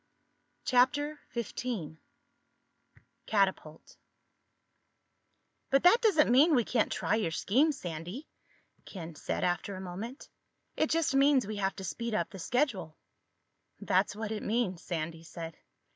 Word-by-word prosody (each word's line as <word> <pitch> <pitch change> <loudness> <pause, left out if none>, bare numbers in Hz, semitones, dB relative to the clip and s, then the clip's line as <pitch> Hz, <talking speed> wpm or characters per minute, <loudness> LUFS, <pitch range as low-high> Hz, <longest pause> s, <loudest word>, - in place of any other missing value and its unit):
CHAPTER 290 +4 +2 0.2
XV 215 -9 -4 1.3
CATAPULT 190 -7 -1 1.7
"But 275 0 +3
that 375 +7 +6
doesn't 340 - +4
mean 295 +6 +6
we 245 - +4
can't 225 0 0
try - - 0
your 215 -6 +1
scheme, 255 - +2
Sandy," 175 - -6 0.6
Ken 170 -4 -8
said 150 - -3
after 180 +3 -1
a - - -7
moment. 195 +8 -7 0.5
"It 310 - +1
just 330 -3 +1
means 275 -2 +4
we 210 +1 -5
have 195 -1 -1
to 190 - -7
speed 230 +4 -3
up 170 -4 -1
the 195 - -9
schedule." 230 - -1 0.8
"That's - - +1
what 220 0 -4
it 215 - -3
means," 210 -6 -1
Sandy 165 -1 -4
said. 165 0 -8
215 Hz, 130 wpm, -31 LUFS, 175-270 Hz, 1.7 s, that